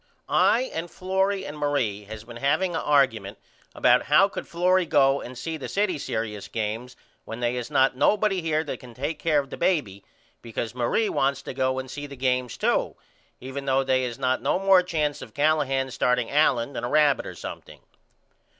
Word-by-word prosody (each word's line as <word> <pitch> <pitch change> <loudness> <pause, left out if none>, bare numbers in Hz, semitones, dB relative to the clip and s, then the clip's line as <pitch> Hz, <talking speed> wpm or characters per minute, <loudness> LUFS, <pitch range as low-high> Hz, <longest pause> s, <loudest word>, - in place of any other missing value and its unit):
I 235 - +4
and 165 +2 -4
Florrie 190 +2 -1
and 145 - -7
Marie 135 -9 -1
has 110 +1 -9
been 120 0 -10
haveing 175 +7 +1
a - - -1
argument 115 -9 +1 0.4
about 125 0 +4
how 170 +7 +5
could 200 - -7
Florrie 180 +1 +2
go 135 -1 +3
and 125 +1 -9
see 160 +5 -4
the 140 - -6
city 195 -6 0
serious 110 -5 -4
games 115 +3 -4 0.3
when 115 +1 -7
they 120 0 0
is 125 +1 -4
not 135 -3 +3
nobody 200 +5 +2
here 160 -1 0
that 145 - -6
can 125 -3 -13
take 145 +4 -3
care 155 -3 +2
of 140 -2 -1
the - - -6
baby 105 - 0 0.4
because 115 0 -5
Marie 125 - 0
wants 135 0 0
to - - -6
go 130 0 0
and 130 0 -5
see 145 0 -6
the 140 - -10
games 125 -2 -1
to - - 0 0.4
even 135 +2 -6
though 135 0 +2
they 130 -1 +1
is 120 -2 -4
not 130 -1 0
no - - +1
more 195 -1 +5
chance 155 -5 -2
of 110 - -11
Callahan 145 -3 +1
starting 125 -1 0
Allen 140 -3 +2
than - - -5
a 120 - -2
rabbit 150 -1 +3
or - - -8
something. - - -9
135 Hz, 195 wpm, -25 LUFS, 125-155 Hz, 0.4 s, how